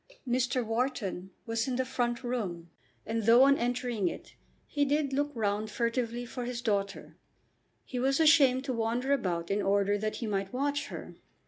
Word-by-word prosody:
Mr. 250 0 +1
Wharton 225 -6 -2 0.2
was 225 +1 -1
in 255 - -1
the 260 +1 0
front 240 -1 -1
room, 185 -9 -3 0.3
and 225 -1 -2
though 235 +3 +8
on 275 +1 +6
entering 240 -4 -1
it - - -6 0.3
he 290 - 0
did 285 -1 +1
look 290 +2 +1
round 210 -1 -1
furtively 235 +1 -1
for 245 +1 -6
his 245 -1 -4
daughter, 200 -4 -2 0.7
he 250 - -4
was 270 +3 +2
ashamed 280 -5 +5
to 270 -2 -2
wander 240 +4 0
about 175 -10 -1
in 205 +1 +1
order 200 +1 +2
that 215 +1 -2
he 235 - -4
might 195 -2 -2
watch 285 +3 -1
her. - - -8
240 Hz, 175 wpm, -30 LUFS, 210-260 Hz, 0.7 s, though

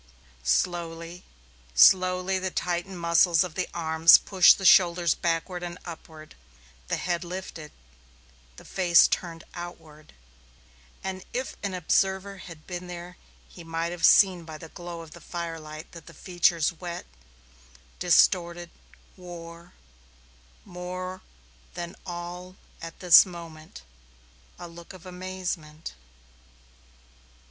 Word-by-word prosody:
Slowly, 165 - -2 0.5
slowly 185 - +5
the 190 0 -2
tightened 180 +1 -3
muscles 170 0 +4
of 180 -3 -7
the 185 +1 -2
arms 160 -1 +6
pushed 190 -3 +5
the 195 - -6
shoulders 175 -3 +5
backward 170 +2 -2
and 175 0 -6
upward; 160 -2 -11 0.5
the - - -1
head 175 -1 -2
lifted; 175 -4 -8 0.9
the - - -13
face 175 -3 +4
turned 165 -2 -4
outward, 160 -3 -10 0.9
and 190 -1 -5
if 255 +2 -4
an 200 -2 -3
observer 190 +3 0
had 165 -4 -12
been 180 0 -7
there 175 0 -9 0.3
he 175 - -13
might 165 +1 -3
have 175 -1 -8
seen 185 -4 +6
by 160 -1 -9
the 160 +1 -11
glow 175 0 -8
of 160 -2 -12
the - - -13
firelight 165 -2 -7
that 170 -2 -13
the - - -13
features 175 -2 +1
wet, 175 +1 -7 0.9
distorted, 175 -1 +2 0.4
wore, 170 -1 -11 0.9
more 185 +1 -7 0.5
than 175 -1 -6
all 175 +1 -7 0.3
at 165 0 -9
this 180 -3 +9
moment, 165 - -11 0.7
a 175 - -9
look 170 +2 -12
of 185 -1 -14
amazement. 180 - -6
175 Hz, 120 wpm, -26 LUFS, 165-180 Hz, 0.9 s, this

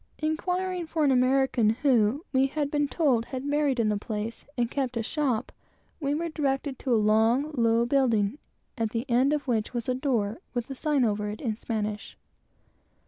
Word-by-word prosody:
Inquiring 360 +3 -2
for 315 -1 0
an 280 - +4
American 255 -3 +3
who, 245 +2 +2
we 265 +1 +4
had 290 0 -2
been 290 -1 +1
told, 270 -7 +1
had 260 +1 -6
married 290 -3 +1
in 220 -2 +2
the 210 - +1
place, 215 +2 -5
and 240 -1 0
kept 260 -4 -2
a 225 - -1
shop, 255 -3 -1 0.5
we 285 -2 0
were 335 +2 -2
directed 275 -3 -2
to 260 - -3
a - - +5
long, 225 +7 +3
low 230 -2 +2
building, 240 -2 +1 0.4
at 225 -1 +1
the 230 +3 -3
end 255 +4 +3
of 295 -2 -1
which 230 0 -1
was 235 -1 -3
a 255 - +1
door, 250 -4 -1 0.2
with 240 -1 -2
a - - -2
sign 290 -2 +1
over 210 -1 -1
it, 210 - -6
in 225 -5 -2
Spanish. 215 -2 -4
255 Hz, 190 wpm, -27 LUFS, 225-290 Hz, 0.5 s, a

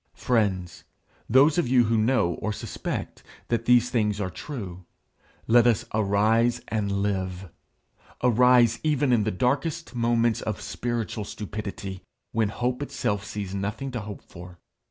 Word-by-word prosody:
Friends, 100 -7 0 0.5
those 140 +7 +5
of 170 - +1
you 125 -1 +5
who 115 0 +1
know, 110 -5 +2
or 110 - -1
suspect, 105 - -5 0.3
that 115 -1 0
these 125 0 +4
things 105 -3 +1
are 95 -3 -2
true, 95 - -7 0.6
let 120 +1 +5
us 115 0 +2
arise 110 +3 +2
and 100 -2 -1
live 95 -3 -3 0.7
arise 125 -1 +5
even 145 -4 +2
in 110 -4 +2
the - - +1
darkest 135 - -1
moments 115 -1 +1
of 110 - -3
spiritual 120 -2 -3
stupidity, 100 -2 -6 0.3
when 110 -2 +1
hope 125 +4 -2
itself 130 -8 -2
sees 100 -3 -5
nothing 105 +7 -3
to 125 - -3
hope 105 -2 -8
for. 90 +1 -12
110 Hz, 140 wpm, -26 LUFS, 100-125 Hz, 0.7 s, those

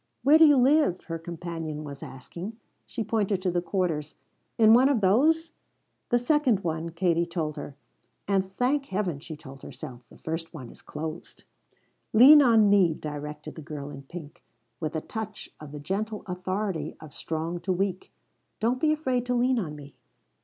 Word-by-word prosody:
"Where 300 +4 +6
do 320 - +9
you 290 -2 +6
live?" 265 - +3
her 165 -1 -5
companion 165 -2 -5
was 140 -2 -8
asking. 175 - -8 0.3
She 230 - -4
pointed 210 -2 0
to 185 - +1
the 175 0 0
quarters. 175 -5 -2 0.4
"In 220 -1 +7
one 255 +4 +6
of 275 -5 +2
those?" 310 - +3 0.6
"The 240 - +4
second 245 -4 +2
one," 165 0 -2
Katie 170 0 +1
told 160 -3 -3
her. 140 - -7 0.5
"And 190 -1 +1
thank 275 +3 +1
Heaven," 190 -6 -2
she 155 +1 -9
told 135 -3 -12
herself, 125 -2 -9
"the - - -16
first 165 +1 -5
one 130 -6 -8
is - - -17
closed!" 155 +2 -7 0.7
"Lean 275 +7 +9
on 225 -5 +5
me," 190 -5 +4
directed 150 0 -7
the 160 - -9
girl 145 -2 -7
in 140 -1 -9
pink, 160 +3 -10 0.4
with 155 0 -3
a 160 - -1
touch 215 +2 -6
of 150 -2 -10
the 150 - -7
gentle 210 +7 -3
authority 185 -3 -3
of 155 -3 -12
strong 165 +2 -3
to 190 - -2
weak. 185 0 -2 0.5
"Don't 240 +3 +1
be 310 - +4
afraid 260 -6 0
to 250 - +1
lean 250 +1 +2
on 155 -7 -4
me." 140 -1 -12
180 Hz, 175 wpm, -27 LUFS, 155-225 Hz, 0.7 s, do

